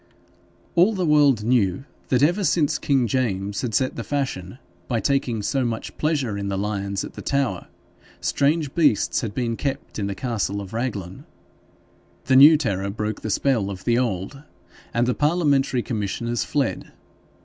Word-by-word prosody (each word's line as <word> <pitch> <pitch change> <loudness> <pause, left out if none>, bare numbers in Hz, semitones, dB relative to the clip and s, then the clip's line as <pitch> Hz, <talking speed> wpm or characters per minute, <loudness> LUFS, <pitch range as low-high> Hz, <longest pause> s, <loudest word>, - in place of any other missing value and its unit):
All 185 +6 +4
the 185 -2 0
world 145 -7 +4
knew 110 -2 +1 0.2
that 130 +1 +2
ever 175 +7 +2
since 160 -5 +1
King 135 -4 +2
James 100 -5 -1
had 120 -4 -2
set 130 -1 +1
the 115 - -4
fashion 125 -9 -3 0.3
by 120 -3 0
taking 125 -5 0
so 135 +5 0
much 115 -2 -4
pleasure 140 -10 0
in 100 - -3
the 100 -1 -2
lions 100 -1 -2
at - - -10
the - - -8
Tower, 135 -10 -1 0.5
strange 145 0 0
beasts 150 -11 +2
had 110 -4 -5
been 120 -2 -1
kept 135 -2 -4
in 100 - -1
the 100 - -4
castle 105 -4 -2
of 100 0 -8
Raglan. 105 -7 -4 1.0
The 130 - +3
new 150 +4 +9
terror 100 -9 -2
broke 105 +1 -4
the 110 - -4
spell 110 -2 +1
of 95 -2 -7
the 120 0 +2
old, 115 +3 -3 0.5
and 120 +1 +1
the 125 - +1
parliamentary 145 -5 +1
commissioners 115 +1 -2
fled. 140 -5 -2
120 Hz, 165 wpm, -23 LUFS, 100-140 Hz, 1.0 s, new